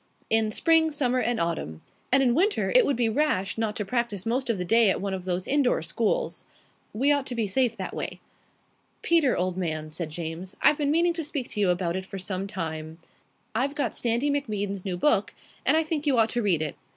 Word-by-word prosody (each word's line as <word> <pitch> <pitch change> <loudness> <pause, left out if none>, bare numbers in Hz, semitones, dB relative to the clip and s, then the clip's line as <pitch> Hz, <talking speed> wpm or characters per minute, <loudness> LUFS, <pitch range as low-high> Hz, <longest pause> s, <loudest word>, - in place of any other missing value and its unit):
"In 220 -1 +4
spring, 320 +7 +3
summer, 255 -4 0
and 240 -1 0
autumn. 160 - -3 0.3
And 270 +1 +5
in 245 -2 +3
winter 390 - +2
it - - +6
would 280 - +1
be 235 -1 +1
rash 220 -7 0
not 220 -1 -2
to 210 - -3
practise 235 -3 -2
most 250 +3 -1
of 230 - +1
the 180 - -3
day 225 +2 +5
at - - +1
one 195 0 -3
of 185 -1 -5
those 180 0 -2
indoor 270 - +2
schools." 185 +7 -1 0.5
"We 270 +7 +2
ought 285 -2 +1
to 245 - -4
be 230 -2 0
safe 235 +3 0
that - - -5
way." - - -5 0.8
"Peter, 325 -7 +3
old 180 0 -1
man," 155 -4 -3
said 160 0 -4
James, 165 +3 -6
"I've 300 0 +4
been 285 -1 +1
meaning 340 +3 +3
to 330 -1 -4
speak 290 -4 -4
to - - -5
you 200 -3 +3
about 175 -1 0
it 190 0 -4
for 195 - -7
some 190 +1 -4
time. 160 -4 -5 0.6
I've 270 +6 -1
got 290 - -1
Sandy 240 +5 0
MacBean's 205 -8 -2
new 185 -3 -3
book, 205 -2 +1 0.3
and 315 - +6
I 320 - +3
think 310 -1 -3
you 270 -4 +3
ought 225 -1 +3
to 240 - 0
read 180 -7 +2
it. 155 - -4
225 Hz, 225 wpm, -26 LUFS, 185-280 Hz, 0.8 s, it